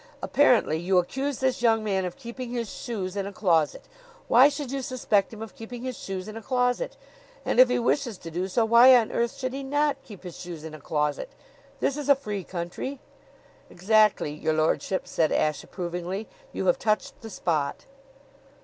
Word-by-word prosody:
Apparently 240 - +3
you 180 +2 +1
accuse 265 +10 -1
this 260 -2 0
young 225 -2 +3
man 190 -3 0
of 180 - -5
keeping 235 +1 -7
his 235 -2 -3
shoes 200 -5 -5
in 200 -1 -2
a - - -6
closet. 170 -7 +1 0.4
Why 255 +5 +7
should 280 -2 -5
you 275 0 -2
suspect 230 -6 0
him 220 -1 -7
of 225 - -10
keeping 245 -1 -9
his 255 -1 -4
shoes 190 -1 -6
in 215 - -8
a 225 - -6
closet? 250 - 0 0.5
And - - +1
if 255 -1 +8
he 250 - +2
wishes 240 -2 0
to 165 - -9
do 180 +3 -2
so, 225 +4 +1
why 235 +3 +8
on 235 -3 +2
earth 235 +3 -1
should 255 -2 -3
not 285 +2 0
he - - -27
keep 205 -5 -12
his 180 -2 -9
shoes 170 -4 -8
in 160 -1 -8
a 155 - -10
closet? 150 - -1 0.5
This 275 - 0
is 290 -1 -4
a 280 - +8
free 210 -7 -5
country." 175 +11 -5 0.7
"Exactly, 210 -3 +3
your 155 +1 -1
lordship," 155 +4 0
said 160 -2 +1
Ashe 155 -1 0
approvingly. 180 +3 -5 0.2
"You - - -3
have - - +3
touched 215 -2 -1
the 225 - -8
spot." 155 -8 -2
220 Hz, 195 wpm, -26 LUFS, 180-255 Hz, 0.7 s, if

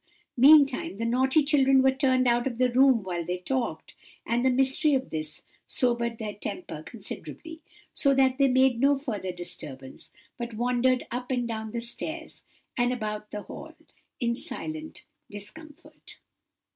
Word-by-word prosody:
Meantime 275 -5 +5
the 230 - -2
naughty 265 +6 +3
children 270 -2 +4
were 265 - +5
turned 260 -2 +2
out 240 +1 +2
of 240 -3 -4
the 250 0 +2
room 255 -3 +4
while 175 -2 -3
they 180 +2 -3
talked, 250 +7 -3 0.3
and 240 +1 0
the 260 - +4
mystery 270 +3 +2
of 265 0 -2
this, 155 -1 -4 0.2
sobered 235 -2 0
their 215 -2 -5
temper 350 - -6
considerably; 325 0 -9 0.3
so 280 - +2
that 265 0 +3
they 275 - +5
made 260 -2 +3
no 280 +2 +4
further 215 -9 -4
disturbance, 135 -7 -8 0.3
but 235 -1 -5
wandered 250 +2 +1
up 245 +1 -4
and 245 -2 0
down 220 -1 -4
the 235 +2 -4
stairs, 315 +7 -6 0.3
and 245 0 +1
about 210 -3 -4
the 210 -1 -6
hall, 320 - -10 0.4
in 235 -1 0
silent 315 +4 -5 0.2
discomfort. 295 - -11
250 Hz, 155 wpm, -27 LUFS, 225-270 Hz, 0.4 s, Meantime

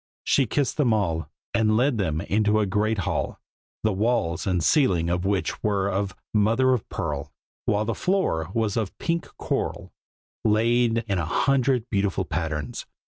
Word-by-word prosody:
She 135 -3 +3
kissed 135 +4 0
them 130 -7 +3
all, 80 -8 0 0.2
and 110 -2 +3
led 125 -1 +2
them 80 -5 0
into 105 +2 +2
a 105 - +2
great 105 +3 0
hall, - - -2 0.4
the 110 -1 +2
walls 100 -5 0
and 90 -3 +1
ceiling 90 - +3
of 90 +1 -1
which 100 -1 -1
were 100 -2 +1
of 95 0 -2 0.2
mother 115 +5 +3
of 120 - -2
pearl, - - -3 0.3
while 105 +1 +1
the 115 - -1
floor 145 - 0
was 110 -2 0
of 110 -5 -2
pink 170 0 -1
coral, - - -3 0.5
laid 115 +2 +2
in 100 -3 0
a 85 - -1
hundred 130 - +1
beautiful 100 -2 0
patterns. 75 -4 -3
105 Hz, 160 wpm, -25 LUFS, 95-120 Hz, 0.5 s, She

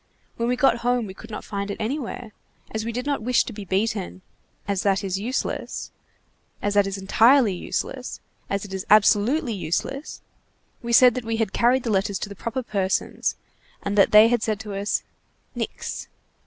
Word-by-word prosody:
When 235 +1 -1
we 250 - +2
got 270 -1 +3
home, 245 0 0
we 190 - -8
could 225 +3 -13
not 210 - -6
find 200 0 -4
it 200 - -4
anywhere. 235 -1 -4 0.4
As 220 0 -3
we 230 - -3
did 250 +3 -4
not 285 -4 -1
wish 245 +2 +3
to 235 - -7
be 205 -1 -8
beaten, 195 -1 -2 0.4
as 200 -2 0
that 200 0 +1
is 190 -1 -2
useless, 245 +6 -3 0.7
as 205 - -1
that 205 -1 +4
is 195 0 -3
entirely 225 +4 +4
useless, 255 +7 -4 0.3
as 200 -1 -1
that 200 -2 -8
is 190 -1 -3
absolutely 215 +6 +4
useless, 200 - -3 0.6
we 235 -1 -4
said 250 +1 +7
that 255 - -4
we 225 0 -2
had 220 -3 -1
carried 250 +2 +3
the 230 - -1
letters 195 0 +1
to 205 - -5
the 200 - -8
proper 230 +6 -4
persons, 195 -4 -1 0.5
and 200 0 -2
that 200 - +5
they 215 +1 +9
had 240 -1 +1
said 215 -2 -1
to 210 -2 -7
us: 200 +1 -1 0.5
'Nix. - - -5
215 Hz, 190 wpm, -24 LUFS, 200-240 Hz, 0.7 s, they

